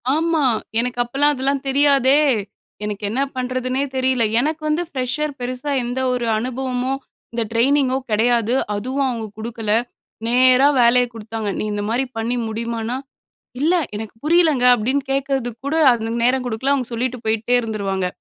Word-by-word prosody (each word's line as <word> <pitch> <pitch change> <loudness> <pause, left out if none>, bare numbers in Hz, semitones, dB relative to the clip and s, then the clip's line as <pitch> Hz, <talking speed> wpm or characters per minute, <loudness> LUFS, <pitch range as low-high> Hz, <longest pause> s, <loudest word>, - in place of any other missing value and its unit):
ஆமா. 320 -2 +1 0.3
எனக்கு 245 0 -2
அப்பலாம் 280 +5 +2
அதெல்லாம் 275 +1 -1
தெரியாதே, 275 0 +4 0.7
எனக்கு 210 0 -4
என்ன 255 +5 -1
பண்ணுறதுன்னே 255 +1 -1
தெரியல. 260 -2 +1 0.2
எனக்கு 310 +4 -1
வந்து 325 +3 +1
ஃப்ரெஷர். 275 +2 -2
பெருசா 255 +3 -4
எந்த 245 +2 -3
ஒரு 245 -1 -1
அனுபவமும் 255 +2 -2 0.3
இந்த 230 -1 0
ட்ரெய்னிங்கோ 260 +3 +2
கெடையாது. 235 +2 +2 0.2
அதுவும் 260 +6 -1
அவங்க 230 -2 -3
குடுக்கல, 225 -1 -4 0.6
நேரா 255 +3 +5
வேலைய 245 +1 +5
குடுத்தாங்க. 225 -1 -5
நீ - - -1
இந்த 205 0 -2
மாரி 250 +4 0
பண்ணி 230 +2 -1
முடிமான்னா, 230 +2 -3 0.6
இல்ல 330 +5 +3 0.2
எனக்கு 220 0 -7
புரியலங்க 315 -5 +3
அப்டின்னு 260 +5 -1
கேட்கிறதுக்கு 265 -4 -2
கூட, 310 - 0 0.2
அது 230 0 -2
நேரம் 250 0 +2
கொடுக்கல 245 +4 0
அவங்க 255 -4 -2
சொல்லிட்டு 250 0 -2
போயிட்டே 225 +2 +1
இருந்துருவாங்க. 200 -4 -2
250 Hz, 140 wpm, -20 LUFS, 230-270 Hz, 0.7 s, நேரா